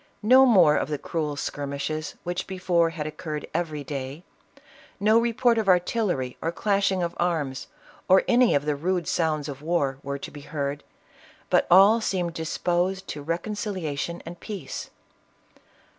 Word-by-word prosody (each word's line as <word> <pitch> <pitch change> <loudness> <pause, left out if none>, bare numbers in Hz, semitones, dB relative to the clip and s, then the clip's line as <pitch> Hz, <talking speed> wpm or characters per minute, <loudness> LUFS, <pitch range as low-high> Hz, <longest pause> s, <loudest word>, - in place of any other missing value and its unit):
No 260 +4 +7
more 175 -10 +6
of - - -1
the 150 - -1
cruel 150 0 -3
skirmishes, 145 +2 -4
which 175 +1 -3
before 180 -3 +1
had 160 -2 -5
occurred 155 0 -5
every 155 -3 -2
day; 140 +3 -6 0.8
no 215 +3 +4
report 235 0 +2
of 215 - -2
artillery 180 - +1
or 165 - -1
clashing 195 0 +1
of 170 0 -2
arms 155 -7 -1 0.4
or 190 +1 +6
any 245 - +4
of 145 +1 0
the 150 -1 0
rude 175 +4 -1
sounds 155 -3 0
of 140 -1 -7
war 145 -5 0
were 140 0 -4
to - - -8
be 145 - -10
heard, 140 -1 -4 0.7
but - - +3
all 200 +6 +7
seemed 180 -5 -1
disposed 175 +4 -1
to 145 - -5
reconciliation 170 -1 -3
and 170 +1 -9
peace." 210 -3 -6
170 Hz, 150 wpm, -25 LUFS, 150-190 Hz, 0.8 s, No